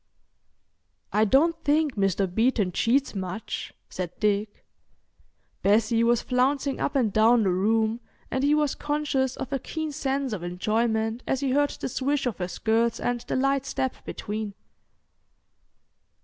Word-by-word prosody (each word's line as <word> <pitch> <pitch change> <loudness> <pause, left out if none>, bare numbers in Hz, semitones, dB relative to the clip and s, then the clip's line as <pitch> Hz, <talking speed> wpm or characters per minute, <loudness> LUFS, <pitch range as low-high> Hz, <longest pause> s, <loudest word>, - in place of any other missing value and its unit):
"I 215 +1 +4
don't 320 +8 +3
think 295 -1 +2
Mr. 195 -1 +1
Beeton 210 +1 +1
cheats 260 +9 +1
much," 195 +2 -5 0.2
said 180 -2 -5
Dick. 205 0 -1 1.0
Bessie 220 +3 +3
was 235 0 +3
flouncing 270 +2 +1
up 285 - -1
and 230 -7 +2
down 225 +1 +5
the 190 - +2
room, 220 +4 +1 0.3
and 265 - 0
he 290 +1 +4
was 300 -2 +1
conscious 290 -3 -1
of 265 +1 -5
a 275 - 0
keen 315 +4 -4
sense 270 -2 -2
of 195 - -4
enjoyment 220 +5 -1
as 265 - 0
he 275 -2 0
heard 290 +2 +3
the - - -5
swish 275 +3 -1
of 245 -5 -2
her 180 - -1
skirts 225 +4 0
and 245 0 -1
the - - -4
light 275 +1 +1
step 265 -1 -2
between. 210 -1 -5
235 Hz, 150 wpm, -26 LUFS, 215-275 Hz, 1.0 s, down